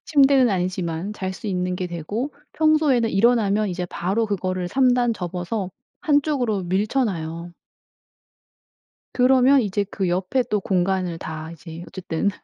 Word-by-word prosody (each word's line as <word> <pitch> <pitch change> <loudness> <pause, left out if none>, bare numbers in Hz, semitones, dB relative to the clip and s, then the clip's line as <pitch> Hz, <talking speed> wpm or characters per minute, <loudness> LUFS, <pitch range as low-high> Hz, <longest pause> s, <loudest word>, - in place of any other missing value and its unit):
침대는 275 -4 +4
아니지만 180 0 -2
잘 190 -3 -4
수 190 - -9
있는 180 -2 -1
게 180 - -3
되고 205 - -4 0.2
평소에는 305 -7 +3
일어나면 215 -1 +3
이제 180 -1 -3
바로 195 +6 -1
그거를 185 -3 -2
3 255 +3 +3
단 240 -1 +2
접어서 185 +1 -4 0.3
한쪽으로 285 - +1
밀쳐놔요. 175 -4 -1 1.6
그러면 260 +2 +5
이제 205 -1 -1
그 195 -2 -1
옆에 185 +9 0
또 210 - +1
공간을 185 -2 0
다 160 0 -6
이제 165 +1 -10
어쨌든 185 0 -2
195 Hz, 285 characters per minute, -23 LUFS, 180-245 Hz, 1.6 s, 그러면